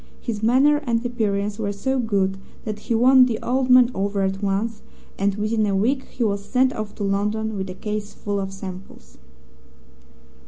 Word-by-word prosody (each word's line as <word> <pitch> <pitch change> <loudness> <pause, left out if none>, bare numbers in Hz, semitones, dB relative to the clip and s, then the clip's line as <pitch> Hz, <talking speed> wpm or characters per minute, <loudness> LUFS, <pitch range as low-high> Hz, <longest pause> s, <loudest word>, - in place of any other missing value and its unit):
His 220 -4 -4
manner 265 +6 +4
and 230 0 0
appearance 210 -3 -1
were 205 -2 -1
so 260 +7 -1
good 195 -4 0 0.3
that 215 -1 -4
he 230 - -2
won 255 +2 +6
the 225 -3 -1
old 255 +1 0
man 250 -1 +6
over 200 0 -1
at 195 +1 -1
once, 210 +2 -1 0.4
and 200 0 +1
within 215 +1 0
a 200 - 0
week 260 +7 +1
he 245 - -4
was 200 -2 0
sent 260 +4 +2
off 215 -1 -6
to - - -5
London 210 +2 -1
with 190 -1 -4
a 185 - -6
case 210 +1 -4
full 205 -1 -3
of 195 -1 -4
samples. 190 -1 -10
210 Hz, 185 wpm, -22 LUFS, 200-240 Hz, 0.4 s, won